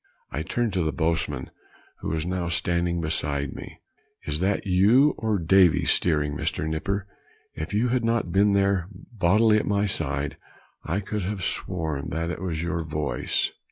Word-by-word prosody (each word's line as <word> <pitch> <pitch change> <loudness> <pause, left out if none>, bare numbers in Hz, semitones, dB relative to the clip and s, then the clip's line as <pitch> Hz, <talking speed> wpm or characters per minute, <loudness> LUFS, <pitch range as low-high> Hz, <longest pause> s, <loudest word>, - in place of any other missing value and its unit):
I 75 - -2
turned 115 +5 -1
to 90 - +1
the 80 - 0
boatswain, 80 -6 -1 0.5
who - - -4
was 80 0 -1
now 90 -1 -2
standing 85 0 0
beside 70 -3 -1
me, - - -10 0.4
"is 75 0 -3
that 95 +3 0
you 105 +10 +5
or 110 -2 +1
Davy 90 -1 +4
steering, 75 -4 +1
Mr. 80 - -1
Nipper? 95 +6 -2 0.5
if 80 +3 -5
you 110 +4 +1
had 125 0 +1
not 115 -6 0
been 100 +3 +4
there 100 -3 +2
bodily 105 +2 +2
at - - -4
my 100 0 +2
side, 70 -7 -2 0.5
I 95 +5 -1
could 105 +1 -3
have 95 0 -3
sworn 80 -7 -3
that 85 +2 -3
was 85 -3 -2
your 85 -1 -1
voice." 75 -6 -1
90 Hz, 160 wpm, -25 LUFS, 80-100 Hz, 0.5 s, you